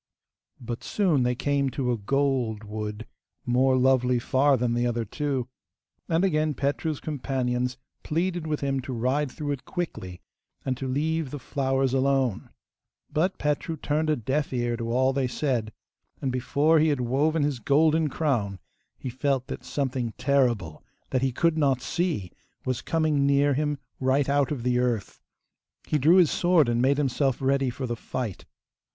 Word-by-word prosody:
But 120 -1 -6
soon 180 -10 +1
they 125 0 +1
came 140 +1 0
to 130 -1 -1
a 120 - 0
gold 125 -2 0
wood 105 +1 -5 0.4
more 130 +2 +3
lovely 125 -1 +3
far 135 +3 +3
than 120 -1 0
the 120 +1 +1
other 120 -1 -1
two, 135 +1 -2 0.6
and 165 +3 +2
again 155 -4 +1
Petru's 145 +3 -1
companions 125 -3 -2 0.2
pleaded 170 +1 -1
with 150 -1 -2
him 135 -1 0
to 130 +1 -6
ride 130 +4 0
through 145 -1 -4
it 140 -3 -4
quickly, 95 - -5 0.5
and 130 - 0
to 135 - -4
leave 155 +3 -1
the 145 - -5
flowers 135 -1 0
alone. 135 -4 +1 0.6
But 170 +5 +1
Petru 150 +2 -1
turned 155 +2 -1
a 155 - +3
deaf 135 +5 -1
ear 120 -2 0
to 115 0 -4
all 130 +2 +2
they 135 -1 0
said, 125 -4 -1 0.5
and 135 - -1
before 145 +5 +2
he 155 - +4
had 145 -4 +1
woven 145 +6 +1
his 145 -4 -1
golden 155 +3 +3
crown 120 -11 -1 0.4
he 130 - -5
felt 130 0 0
that - - -6
something 130 -5 -2
terrible, 120 - +1 0.3
that 130 - +1
he 135 0 +1
could 160 +5 +1
not 135 -4 +2
see, 150 - -2 0.3
was 130 -2 -1
coming 155 -4 +1
near 140 0 +3
him 145 +1 0 0.2
right 130 +1 +2
out 140 -1 +2
of 135 -6 -3
the 125 0 +2
earth. 120 -5 -1 0.6
He 150 - 0
drew 155 +6 +5
his 180 -5 +5
sword 175 -5 +3
and 120 0 +1
made 135 +2 +3
himself 135 -2 +1
ready 135 0 +1
for 125 +2 -4
the 120 -1 -2
fight. 115 -5 -5
135 Hz, 170 wpm, -26 LUFS, 125-150 Hz, 0.6 s, drew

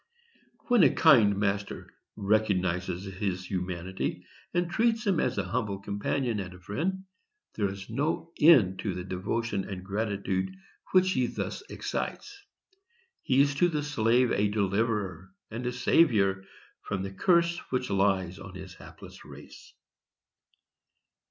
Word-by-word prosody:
When 245 -4 +5
a 145 - +7
kind 115 -12 +5
master 100 0 -2 0.2
recognizes 95 -3 0
his 95 -1 -3
humanity, 90 0 -4 0.3
and 175 0 0
treats 225 +5 +1
him 190 -5 +2
as - - 0
a 100 - +1
humble 100 +1 -2
companion 105 +4 -2
and 90 -2 -6
a - - -14
friend, 170 - -3 0.5
there 100 -3 0
is 95 0 -8
no 160 +3 -2
end 120 - +6
to 95 -4 -2
the 90 - -4
devotion 100 +3 -2
and 95 -2 -6
gratitude 100 -2 -2 0.4
which 185 0 +4
he 125 -7 +1
thus - - -4
excites. 415 - -4 0.9
He 135 +1 +3
is 140 0 +3
to 175 +6 +3
the 150 -3 -2
slave 125 -3 +2
a 105 +1 +2
deliverer 100 -3 -1 0.2
and 120 +3 -4
a - - 0
saviour 105 - +3 0.4
from 95 -1 -3
the 95 - -5
curse 170 - +2
which 125 -3 -2
lies 95 -2 +1
on - - -10
his - - -9
hapless - - -13
race. - - -13
105 Hz, 140 wpm, -28 LUFS, 95-140 Hz, 0.9 s, a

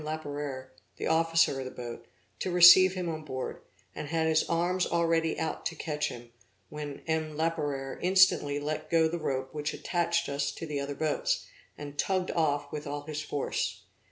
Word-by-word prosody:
Laperere, 145 -4 -5 0.3
the - - -4
officer 165 -3 +3
of 130 - -4
the - - -4
boat, 120 -2 -8 0.3
to - - -2
receive 180 +1 +8
him 180 -2 -3
on 155 -1 -4
board, 130 -3 -5 0.3
and 150 - -6
had 160 +1 0
his 160 0 +3
arms 175 +2 +1
already 165 -1 +1
out 160 - -3
to 165 - -6
catch 150 -1 -2
him, 120 0 -10 0.4
when 150 -2 -7
M. 160 -2 -2
Laperere 145 -5 -2
instantly 180 -6 +4
let 155 +1 -4
go 165 -1 +4
the 170 +2 -3
rope 130 -4 -3
which 150 0 -3
attached 170 -1 0
us 140 0 -1
to - - -6
the 150 -2 -3
other 140 0 -4
boats, - - 0 0.3
and 145 0 -9
tugged 185 -1 0
off 145 -3 0
with 150 0 -5
all 145 0 -4
his 150 0 -4
force. 145 -2 -3
155 Hz, 180 wpm, -29 LUFS, 145-165 Hz, 0.4 s, receive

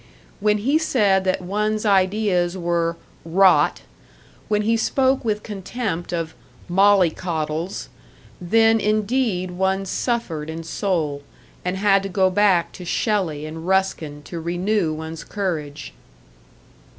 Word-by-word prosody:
When 210 0 +2
he 275 +9 +2
said 205 -11 +2
that 185 0 0
one's 210 +3 -1
ideas 190 -2 +2
were 170 -1 -1 0.3
"rot," 185 +3 +4 0.7
when 210 0 +1
he 225 +2 +2
spoke 260 +3 +1
with 215 -2 -1
contempt 195 -3 -4
of 165 -2 -3 0.3
"mollycoddles" 175 -3 +1 0.5
then 225 +5 +4
indeed 210 -3 0
one 190 +2 0
suffered 185 -8 -2
in 165 +1 -5
soul, 165 -5 -2 0.4
and 180 +1 -2
had 195 0 +3
to 195 - -5
go 190 0 +2
back 190 -3 +3
to 180 - -10
Shelley 175 -5 -1
and 160 +2 -7
Ruskin 170 -6 0
to 170 - -7
renew 175 +2 0
one's 160 +1 -6
courage. 155 - -4
190 Hz, 120 wpm, -22 LUFS, 170-210 Hz, 0.7 s, rot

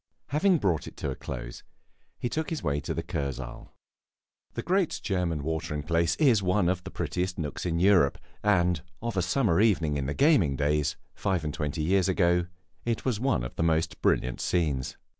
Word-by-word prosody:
Having 170 +7 +3
brought 90 - 0
it - - -11
to - - -2
a - - -4
close, - - -7 0.6
he - - -2
took 155 +5 -2
his 160 - -4
way 70 -1 0
to - - -4
the 85 - -2
Kursaal. 70 -7 -5 0.9
The - - -3
great 185 0 +1
German 90 -6 -1
watering 80 -1 -2
place 85 +2 +1
is 125 -9 +4
one 90 -1 +2
of 90 -1 -1
the 95 - -7
prettiest 90 -1 -2
nooks 80 +2 -3
in 85 -1 0
Europe, 90 -7 +4 0.2
and 90 -5 +2 0.2
of 115 -2 -2
a 95 - +2
summer 95 0 +2
evening 80 -9 +2
in 70 -1 -2
the 70 - -2
gaming 135 - +4
days, 75 0 +1 0.2
five 95 -4 -1
and 75 -1 -3
twenty 75 0 -2
years 95 +3 +2
ago, 90 -2 +2 0.4
it 115 -1 -2
was 125 -6 0
one 125 - +1
of - - -6
the - - 0
most 80 0 0
brilliant 65 0 +1
scenes. 75 -7 0
85 Hz, 190 wpm, -28 LUFS, 75-100 Hz, 0.9 s, is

